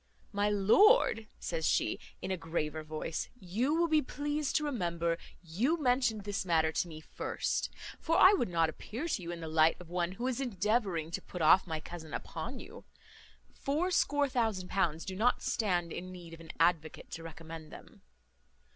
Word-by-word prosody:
"My 205 0 +1
lord," 225 - +5
says 165 -2 -2
she, - - +1 0.2
in 190 - -2
a - - +1
graver 160 -2 -3
voice, 155 +1 -4
"you 225 - 0
will 340 +1 +3
be 310 -2 +4
pleased 290 +1 -2
to 305 - +3
remember, 170 - -1 0.3
you 230 - 0
mentioned 245 -6 +2
this 205 -1 -2
matter 160 -3 +2
to 175 - -1
me 155 -2 -9
first; - - -2 0.3
for 330 +1 +1
I 380 - +8
would 245 - +1
not 165 -2 +2
appear 225 - -5
to 305 - -1
you 170 - -7
in 170 -1 -6
the 160 - -5
light 160 +1 +3
of 180 -2 -12
one 175 0 -1
who 235 +5 -5
is 260 0 -1
endeavouring 205 -8 0
to - - -3
put 180 -3 -5
off 180 +5 +6
my 160 -2 -2
cousin 160 -1 -8
upon 175 +11 -5
you. 435 +7 -11 0.7
Fourscore 290 -1 +1
thousand 220 -8 -1
pounds 170 -4 0
do 190 - -5
not 235 +6 +2
stand 175 -6 0
in 185 +2 -6
need 175 -2 -10
of 165 - -10
an 165 -1 -12
advocate 160 -3 +1
to 165 - -6
recommend 165 -1 -9
them." - - -13
185 Hz, 180 wpm, -32 LUFS, 165-250 Hz, 0.7 s, I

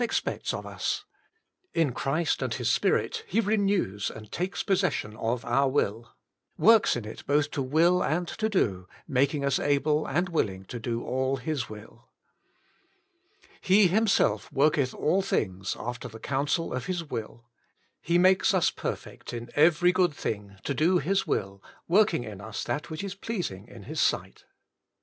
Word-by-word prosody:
Expects 230 - -1
of - - -5
Us. - - -3 0.7
In 160 -6 +2
Christ 155 +7 0
and, - - -1
His - - 0
Spirit 450 -2 +1
He 310 - +1
renews 200 - +1
and 110 -1 -11
takes 180 +2 -2
pos 195 -2 +2
session 110 - -1
of 115 +2 -2
our 140 0 +2
will: 115 -4 -1 0.4
works 225 -1 +5
in 120 -3 -4
it 110 - -8
both 145 +1 +2
to 140 - -2
will 165 +7 +3
and 175 +3 0
to 220 +5 -2
do, 95 - 0 0.2
making 140 +2 +1
us 140 -1 +2
able 150 +1 +1
and 175 +7 0
willing 95 - -1
to 120 - -6
do 115 +1 -3
all 130 +1 0
His 140 -1 -3
will. 110 +2 -12 1.5
He 195 +1 +5
Himself 215 +2 +2
worketh 140 -2 +2
all 185 +6 +2
things 95 - -1
after 120 0 -5
the 110 - -10
coun 140 +3 -1
sel 165 +4 0
of 125 - -4
His 180 -2 -2
will. 115 -5 -6 0.6
"He 170 +1 +2
makes 190 +3 +4
us 180 - +3
perfect - - -6
in 120 0 -6
every 170 +3 +5
good 180 -4 +2
thing 100 -5 -4
to 140 - -1
do 165 +7 +3
His 190 +6 0
will, 100 0 -2 0.3
working 200 - +3
in 105 -3 -8
us 105 +1 -5
that 120 +7 -3
which 160 +3 -5
is 195 -2 -4
pleasing 180 - -5
in 115 -4 -12
His 155 +8 -5
sight." - - -1
145 Hz, 170 wpm, -27 LUFS, 115-180 Hz, 1.5 s, works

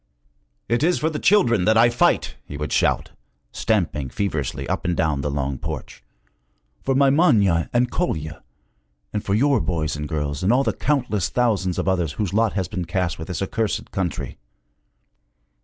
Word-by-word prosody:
'It 120 +2 +1
is 175 +3 +3
for 160 +1 0
the 150 - -3
children 120 - +4
that 110 +1 +4
I 120 +1 +6
fight!' 120 - +2
he 75 - -8
would 75 +1 -3
shout, - - +1 0.4
stamping 85 - -1
feverishly 70 - -3
up - - -2
and 85 -1 -1
down 80 -4 +1
the 75 - -2
long 70 -1 -2
porch; - - -7 0.8
'for 135 - 0
my 135 0 +5
Manya 100 - +3
and 125 0 +1
Kolya, 80 - -2 0.7
and 105 - -2
for 100 - 0
your 135 +2 +3
boys 80 -7 -1
and 75 0 -5
girls 75 -2 -2
and 95 - +2
all 130 +3 +3
the - - 0
countless 125 - 0
thousands 105 -7 0
of - - -2
others 90 -6 +1
whose 100 -1 -3
lot 110 0 +2
has 95 -3 -1
been 90 +1 -4
cast 90 0 -2
with 80 - -6
this 90 +1 -3
accursed 110 +2 -2
country! 95 -9 -3
95 Hz, 175 wpm, -22 LUFS, 80-120 Hz, 0.8 s, I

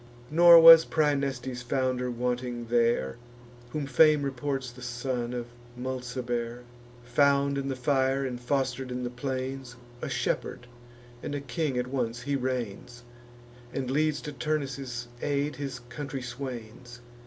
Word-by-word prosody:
Nor 170 +1 +9
was 165 0 +11
Praeneste's 140 -5 -1
founder 130 0 -1
wanting 125 0 -2
there, 115 - +1 0.5
Whom 145 +3 -3
fame 150 +2 +5
reports 135 -1 -3
the 125 +1 -14
son 120 0 -3
of 120 -1 -4 0.3
Mulciber: 125 -2 -4 0.4
Found 140 +2 +2
in 140 0 -2
the 135 - -2
fire, 135 +1 +1
and 125 -2 -4
foster'd 130 0 -1
in 125 0 -3
the 120 - -3
plains, 130 0 -4 0.3
A 155 - -3
shepherd 125 -1 -2 0.6
and 145 - -4
a - - -2
king 140 +1 -2
at 125 - 0
once 125 -2 -3
he 140 +2 -1
reigns, 125 -2 -4 0.7
And 130 -2 -2
leads 150 +1 +1
to 150 - -6
Turnus' 135 -3 -3
aid 145 0 -1
his 135 -3 -4
country 130 +2 -7
swains. 120 -1 -8
130 Hz, 135 wpm, -28 LUFS, 125-140 Hz, 0.7 s, was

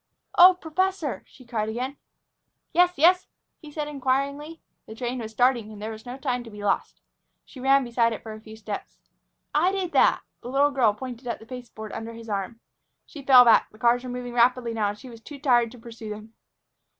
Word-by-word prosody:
"Oh, 365 +1 +9
professor!" 345 -2 -2
she 255 - -18
cried 220 -3 -2
again. 250 +5 -4 0.8
"Yes? 355 +1 +4
Yes?" 360 +5 +4 0.3
he 305 -3 -11
said 300 0 -4
inquiringly. 280 +3 -2 0.3
The 220 - -9
train 245 +1 -3
was 220 -2 -6
starting 240 -2 +1
and 210 - -10
there 215 +2 -5
was 220 +2 -10
no 250 +2 -6
time 250 -3 -2
to 230 - -11
be 210 -1 -10
lost. 200 -1 -1 0.4
She 265 - -13
ran 270 +1 +4
beside 235 -1 +1
it 225 - -6
for 220 -1 -7
a 215 - -11
few 220 0 -12
steps. 215 -2 -7 0.6
"I 340 +5 +3
did 380 -3 -2
that!" - - +4 0.2
The 245 - -8
little 280 +2 +3
girl 240 -7 +2
pointed 250 +1 -8
at 235 - -2
the 220 - -15
pasteboard 230 -3 -9
under 225 +1 -6
his 230 0 -11
arm. 205 +3 -3 0.5
She 295 - -11
fell 260 -2 +8
back. 230 - +5
The 215 - -19
cars 240 +2 +2
were 255 - -6
moving 245 0 -5
rapidly 240 0 +2
now, 215 -2 0
and 205 - -6
she 255 - -12
was 230 -2 -12
too 290 +5 -10
tired 245 -5 +3
to - - -12
pursue 230 -1 -10
them. 215 +1 -9
245 Hz, 210 wpm, -25 LUFS, 225-275 Hz, 0.8 s, Oh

